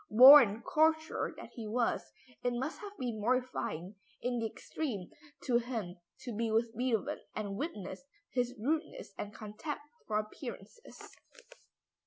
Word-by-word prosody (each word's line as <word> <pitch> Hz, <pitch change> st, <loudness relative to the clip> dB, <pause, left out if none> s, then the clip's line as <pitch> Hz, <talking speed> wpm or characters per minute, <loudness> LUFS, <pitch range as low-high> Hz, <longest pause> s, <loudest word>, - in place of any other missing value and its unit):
Born 235 Hz, -2 st, +9 dB
courtier 315 Hz, +2 st, +2 dB
that -, -, -10 dB
he 230 Hz, -4 st, -6 dB
was, 235 Hz, +2 st, 0 dB, 0.3 s
it 245 Hz, -, +1 dB
must 265 Hz, +6 st, -3 dB
have 410 Hz, -1 st, -9 dB
been 235 Hz, -4 st, -3 dB
mortifying 215 Hz, -6 st, -1 dB, 0.2 s
in 245 Hz, -1 st, -1 dB
the 225 Hz, -, 0 dB
extreme 220 Hz, -, -5 dB, 0.3 s
to 240 Hz, -3 st, +3 dB
him 225 Hz, -7 st, -4 dB, 0.2 s
to 240 Hz, -4 st, -5 dB
be 225 Hz, +1 st, 0 dB
with 225 Hz, +1 st, +1 dB
Beethoven 235 Hz, -3 st, 0 dB, 0.2 s
and 205 Hz, -2 st, -3 dB
witness 210 Hz, -, -5 dB, 0.3 s
his 245 Hz, 0 st, 0 dB
rudeness 320 Hz, -, -2 dB
and 205 Hz, -, -4 dB
contempt 215 Hz, +8 st, -6 dB, 0.2 s
for 210 Hz, -, +1 dB
appearances. 215 Hz, -, -7 dB
235 Hz, 135 wpm, -33 LUFS, 215-260 Hz, 0.3 s, Born